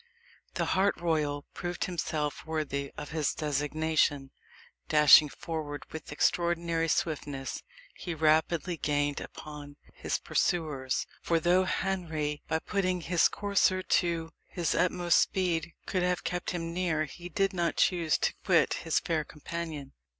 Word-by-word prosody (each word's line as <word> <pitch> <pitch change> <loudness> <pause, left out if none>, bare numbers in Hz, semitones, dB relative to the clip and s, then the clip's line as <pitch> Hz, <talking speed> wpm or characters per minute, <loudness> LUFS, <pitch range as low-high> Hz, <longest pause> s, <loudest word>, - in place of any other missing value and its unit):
The - - 0
hart 195 +2 +2
royal 150 -4 0
proved 175 0 -3
himself 155 -5 -2
worthy 150 -3 -3
of 150 +1 -7
his 155 -3 0
designation. 150 -1 0 0.6
Dashing 150 0 +8
forward 150 -2 -5
with 160 -2 -8
extraordinary 170 +1 +1
swiftness, 145 -4 -2 0.3
he 175 -2 -5
rapidly 160 +3 +2
gained 145 -1 0
upon 145 -1 -9 0.2
his - - -2
pursuers 145 -7 -1 0.2
for 165 -1 +1
though 180 +3 +3
Henry, 160 -7 -2
by 160 - +1
putting 185 +1 -1
his 170 0 +3
courser 195 -2 +1
to 165 -3 +1 0.2
his 175 -2 -1
utmost 175 0 +3
speed, 170 -3 0
could 185 - -1
have 180 0 0
kept 180 0 -2
near 170 -1 -1
him, - - -5
he 175 +4 -9
did 195 +1 +1
not 170 -2 0
choose 170 -4 +2
to - - 0
quit 170 -6 +3
his 165 -2 +1
fair 160 -2 -1
companion. 150 -2 -6
165 Hz, 135 wpm, -29 LUFS, 150-175 Hz, 0.6 s, Dashing